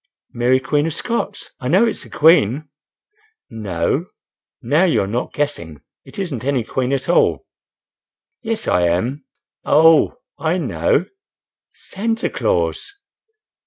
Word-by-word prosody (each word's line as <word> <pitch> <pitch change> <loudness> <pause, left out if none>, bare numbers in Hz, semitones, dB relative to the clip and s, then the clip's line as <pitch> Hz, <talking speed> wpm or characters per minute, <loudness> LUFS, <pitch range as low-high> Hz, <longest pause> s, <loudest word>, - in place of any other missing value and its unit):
"Mary, 125 +2 +2
Queen 145 +3 0
of 160 - -3
Scots?—I 235 - -4
know 185 - +4
it's 230 - -3
a - - -14
queen." 150 - +3 0.8
"No. 105 - -2 0.5
Now 145 +9 +2
you 180 -4 +2
are - - -4
not 120 +5 -3
guessing—It 85 - -6
isn't 170 - -4
any 135 -3 0
queen, 130 +3 -2
at 135 -1 -1
all." 175 - +2 1.0
"Yes, 225 -1 -3
I 90 -1 +2
am—Oh! 140 - +1 0.2
I 165 +3 0
know—Santa 190 - -3
Claus." 405 -4 -1
145 Hz, 110 wpm, -19 LUFS, 120-175 Hz, 1.0 s, know